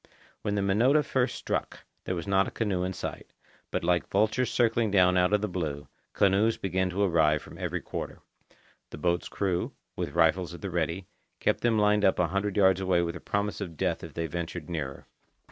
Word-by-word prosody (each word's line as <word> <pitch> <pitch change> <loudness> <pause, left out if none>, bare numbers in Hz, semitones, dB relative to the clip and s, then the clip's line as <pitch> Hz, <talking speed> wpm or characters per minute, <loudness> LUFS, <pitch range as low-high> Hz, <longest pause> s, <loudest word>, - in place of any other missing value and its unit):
When 105 - -1
the 100 - 0
Minota 120 +10 +4
first 130 -4 0
struck, - - -3 0.2
there 90 - -1
was 85 - -4
not 95 0 +2
a - - -3
canoe 100 -5 -1
in 90 - -1
sight; - - -6 0.4
but - - -2
like 85 0 +1
vultures 110 +5 +2
circling 115 -2 +2
down 90 -2 +4
out 90 +1 +3
of 105 -1 +3
the 105 - 0
blue, 75 -7 -4 0.2
canoes 100 +3 +3
began 95 0 0
to 95 +3 0
arrive 80 -5 +3
from - - -12
every - - -2
quarter. - - -6 0.7
The - - -8
boat's 85 +3 0
crew, 90 -3 -1 0.2
with 70 - -4
rifles 85 +1 +2
at - - -12
the 100 - -4
ready, 85 +2 -1 0.3
kept - - +1
them 115 -2 +2
lined 105 0 +3
up 95 - +4
a 90 -2 +1
hundred 100 +2 -1
feet 95 -2 +4
away 90 -2 +2
with 85 0 -3
a - - -6
promise 100 +3 -2
of 85 -5 -6
death - - -1
if - - -9
they 85 - -1
ventured 85 +1 -5
nearer. 70 -5 -4
95 Hz, 205 wpm, -28 LUFS, 85-105 Hz, 0.7 s, Minota